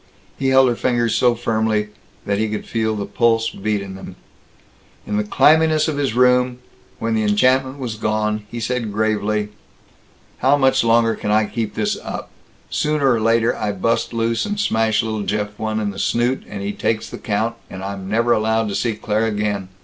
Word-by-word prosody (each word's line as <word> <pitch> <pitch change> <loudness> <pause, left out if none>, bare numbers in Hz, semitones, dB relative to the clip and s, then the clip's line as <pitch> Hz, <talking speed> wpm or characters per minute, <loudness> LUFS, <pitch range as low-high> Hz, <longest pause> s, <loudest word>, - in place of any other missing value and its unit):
He 135 - 0
held 130 0 +5
her 120 - +1
fingers 120 -2 0
so 120 -1 +3
firmly 110 -2 0 0.4
that 100 0 0
he 110 0 0
could 105 - -4
feel 110 -1 -1
the 100 -1 -3
pulse 115 -1 +1
beat 105 0 -2
in 95 -1 -8
them. 95 - -9 0.9
In 105 - -2
the 105 - +1
clamminess 155 +7 +4
of 155 -2 -2
his 140 -5 -1
room, 125 0 +3 0.4
when 115 0 -2
the 110 - +1
enchantment 130 +6 +2
was 125 -5 -4
gone, 105 -1 -1
he 120 - -6
said 115 -1 -2
gravely: 105 0 0 0.9
"How 135 +3 +4
much 135 -3 +3
longer 115 0 +3
can 105 - -5
I 105 +1 +3
keep 110 0 -4
this - - -1
up? - - -6 0.4
Sooner 150 -3 +1
or 115 -2 +1
later 115 +1 +2
I 105 -1 -2
bust 115 +4 0
loose 115 0 0
and 205 0 -3
smash 110 - +1
little 110 -1 -3
Jeff 105 0 -1
one 110 0 -1
in 105 -1 -1
the 100 - -8
snoot, 120 +5 0
and 100 -1 -6
he 100 - -2
takes 110 +1 -1
the - - -8
count, 110 +2 -1
and 95 0 -8
I'm 95 -1 -5
never 115 +3 +1
allowed 110 0 +1
to 100 - -3
see 115 +2 0
Claire 110 +1 0
again. 105 -3 -2
110 Hz, 195 wpm, -20 LUFS, 105-120 Hz, 0.9 s, held